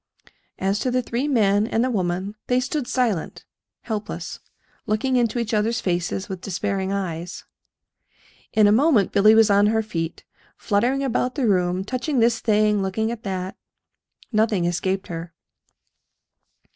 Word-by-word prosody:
As 195 +2 0
to 255 - -1
the 250 0 0
three 240 +5 -2
men 210 -6 +2
and 230 0 +1
the 255 - 0
woman, 185 -1 -2
they 250 0 +2
stood 255 +1 -2
silent, 230 -10 -1 0.4
helpless, 215 -2 -5 0.5
looking 235 +5 0
into 240 -1 +1
each 235 -1 -2
other's 220 +3 +1
faces 180 +1 -2
with 190 -3 -6
despairing 195 0 -2
eyes. 180 -3 -4 1.1
In 215 - +4
a 205 - +5
moment 235 - +3
Billy 215 +2 +5
was 220 -1 +5
on 200 +1 +5
her 220 +1 +1
feet, 165 -6 -4 0.3
fluttering 245 +6 +1
about 250 -1 -1
the 275 -4 0
room, 180 -2 +1
touching 255 +6 -2
this 230 0 +3
thing, 210 -2 +2
looking 220 +4 -1
at 235 -2 -6
that. 190 -2 -4 0.8
Nothing 215 -5 +2
escaped 185 +2 -1
her. 165 0 -7
210 Hz, 145 wpm, -23 LUFS, 190-235 Hz, 1.1 s, a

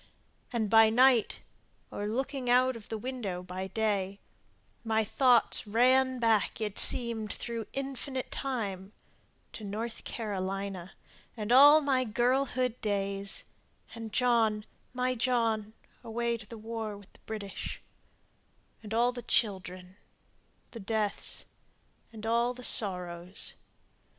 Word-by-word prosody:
And 230 -4 0
by 225 +1 +6
night, 245 0 +4 0.5
or 205 - -4
looking 260 +3 -2
out 255 +1 +4
of 225 -3 -11
the 225 - -3
window 215 -7 -5
by 185 +1 -5
day 200 -1 -1 0.6
My 220 -1 +1
thought 245 +2 +4
ran 255 +4 +3
back, 225 -4 +1
it 210 -2 -2
seemed, 225 -3 +4
through 230 -3 -5
infinite 270 -1 -5
time 205 -7 -4 0.6
To 220 - -9
North 220 +3 -5
Carolina 195 -3 -4 0.4
and 215 +1 -3
all 290 +4 +8
my 270 -3 +1
girlhood 250 +1 0
days, 200 -2 -2 0.5
And 225 -2 -7
John, 225 -4 +2 0.3
my 255 0 0
John, 225 -3 0 0.3
away 235 0 -1
to 220 -3 -10
the 230 - -9
war 220 -1 -5
with 200 -1 -17
the - - -18
British, 205 -3 -6 1.0
And 220 0 -5
all 240 +2 +3
the 245 0 -7
children, 185 -5 -2 0.7
the 230 - -8
deaths, 210 0 -2 0.7
and 220 -1 -9
all 235 +2 +1
the 250 - -10
sorrows. 180 -4 +1
225 Hz, 120 wpm, -30 LUFS, 205-245 Hz, 1.0 s, all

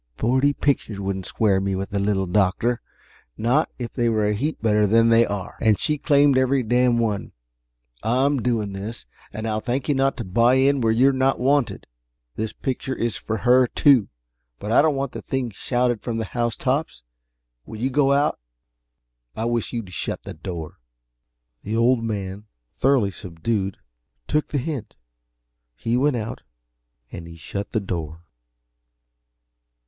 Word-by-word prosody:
Forty 130 +5 +2
pictures 135 -8 -1
wouldn't 95 -1 -3
square 100 -4 +2
me 95 0 -1
with 95 +2 -4
the 100 - -1
Little 100 -1 +1
Doctor 100 +5 +1 0.6
not 125 +7 +2
if 120 -2 -6
they 120 -2 +1
were 110 -2 +1
a 105 - +1
heap 145 +9 -2
better 105 -1 +3
than 115 +2 +4
they 115 0 +5
are, 100 -3 -5
and 110 -2 +4
she 150 -1 -1
claimed 145 -3 +4
every 130 0 +2
darned 120 +1 +2
one. 105 -4 -2 0.7
I'm 130 +3 +1
doing 110 -4 -1
this, 105 +4 -6 0.3
and 110 +1 -5
I'll 110 -1 -1
thank 125 +4 -2
you 145 - +3
not 135 0 +1
to 120 - -3
buy 115 +6 +3
in 135 +1 +3
where 115 -1 +3
you're 130 +5 +4
not 130 +1 +1
wanted. 140 -1 +1 0.5
This 110 0 -3
picture 130 0 -3
is 115 -1 -1
for 110 - -3
her, 125 +3 +4
too 130 -5 +4 0.5
but 105 - -5
I 120 - +6
don't 155 -1 +2
want 135 -1 -2
the - - -7
thing 130 -3 -2
shouted 120 +2 0
from 115 -2 -3
the 110 - -2
housetops. 120 - -2 0.6
When 110 - -9
you 130 +4 -1
go 140 0 +3
out, 140 +2 +2 1.0
I 110 - -2
wish 120 -1 -1
you'd 115 -7 -5
shut - - -4
the - - -7
door." 80 -1 -7 0.8
The 110 +2 -3
Old 120 0 +3
Man, 100 -2 -4 0.3
thoroughly 130 -7 +2
subdued, 95 +2 -3 0.5
took 150 0 0
the 145 - -2
hint. 140 -3 -4 0.8
He 115 +1 -1
went 135 +2 +2
out, 110 -1 -4 0.7
and 85 -1 -8
he 85 0 -11
shut 100 +5 -6
the 110 - +1
door. 85 -4 -5
115 Hz, 165 wpm, -23 LUFS, 105-130 Hz, 1.0 s, I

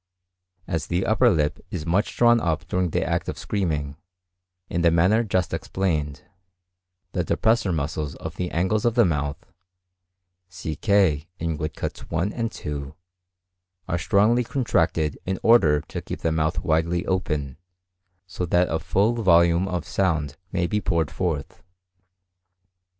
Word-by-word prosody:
As 80 -4 -3
the 90 +2 0
upper 120 +3 +4
lip 75 -7 +1
is 80 -4 -5
much 90 +6 0
drawn 120 -1 +5
up 85 0 -1
during 90 +1 0
the - - -1
act - - -1
of - - -5
screaming, 75 -8 -2 0.7
in 85 - -2
the 85 - +5
manner 90 +8 +3
just 95 -5 -1
explained, 75 -8 -2 0.9
the 90 - -1
depressor 110 +5 +1
muscles 75 -2 -2
of 80 +2 -7
the 90 -1 -3
angles 95 +6 0
of 120 -1 +1
the 120 -3 +5
mouth 75 -4 -1 1.1
(see 90 -4 -5
K 95 -7 +2
in 80 -1 -2
woodcuts 75 +1 -5
1 85 +5 -1
and 115 -1 -2
2) 70 -5 -6 0.9
are 85 - -1
strongly 110 +8 +3
contracted 95 - 0
in 95 0 -1
order 80 -11 +5
to - - -7
keep - - -7
the 80 - +1
mouth 80 +1 0
widely 85 +1 +1
open, 75 -8 -2 0.7
so 90 0 -5
that 90 +1 +2
a 80 - 0
full 105 +5 +1
volume 85 -1 +4
of 90 -4 -3
sound 80 -7 0 0.2
may 90 -2 0
be 105 +4 -1
poured 80 -4 0
forth. 80 -7 -3
85 Hz, 145 wpm, -24 LUFS, 80-95 Hz, 1.1 s, drawn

